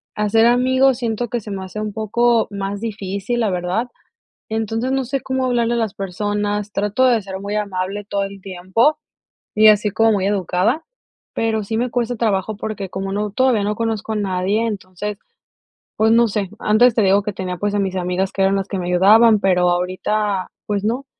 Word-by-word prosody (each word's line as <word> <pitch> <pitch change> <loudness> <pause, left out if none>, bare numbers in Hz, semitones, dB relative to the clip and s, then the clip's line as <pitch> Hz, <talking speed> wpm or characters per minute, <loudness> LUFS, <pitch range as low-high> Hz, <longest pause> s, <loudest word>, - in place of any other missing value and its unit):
hacer 210 +2 +3
amigos 255 +1 +3
siento 235 -1 -2
que 240 - -1
se 210 - -10
me 195 -1 -4
hace 200 +3 -7
un 215 -1 -4
poco 230 +2 +1
más 200 0 -4
difícil 210 +1 -3
la 220 -3 +1
verdad. 180 +6 -1 0.6
Entonces, 225 +3 -1
no 270 -1 0
sé 265 +1 -3
cómo 260 -1 -1
hablarle 240 -1 +1
a - - 0
las 220 -3 -1
personas 205 +1 -2
trato 210 +6 +1
de 235 -4 +3
ser 190 0 -7
muy 200 +1 -4
amable 200 0 -3
todo 200 -1 -2
el 195 -1 -9
tiempo 190 +11 +1 0.6
y 215 0 +6
así 210 0 +4
como 225 0 +3
muy 195 -2 0
educada, 200 - 0 0.5
pero 220 -2 0
sí 220 +2 -2
me 245 +1 -1
cuesta 245 0 -1
trabajo 215 -2 -1
porque 205 -3 -5
como 195 +1 -4
no 210 0 -2
todavía 250 -2 +2
no 210 +1 -1
conozco 225 -1 -2
a - - -1
nadie, 200 +3 0
entonces, 205 -1 -5 0.8
pues 220 +1 +3
no 235 0 +5
sé, 200 -3 -2
antes 225 +3 +4
te 225 - +3
digo 200 0 +3
que 210 - -3
tenía 185 -1 -4
pues 205 +2 -1
a 205 - +1
mis 190 -1 -1
amigas 180 +2 -1
que 195 - -3
eran 195 +1 +3
las 195 0 -2
que 195 - -3
me 175 - -4
ayudaban, 210 +5 +5
pero 180 -2 +3
ahorita 185 +2 -1 0.2
pues 205 -1 -2
no. 250 +5 -1
210 Hz, 200 wpm, -20 LUFS, 195-225 Hz, 0.8 s, y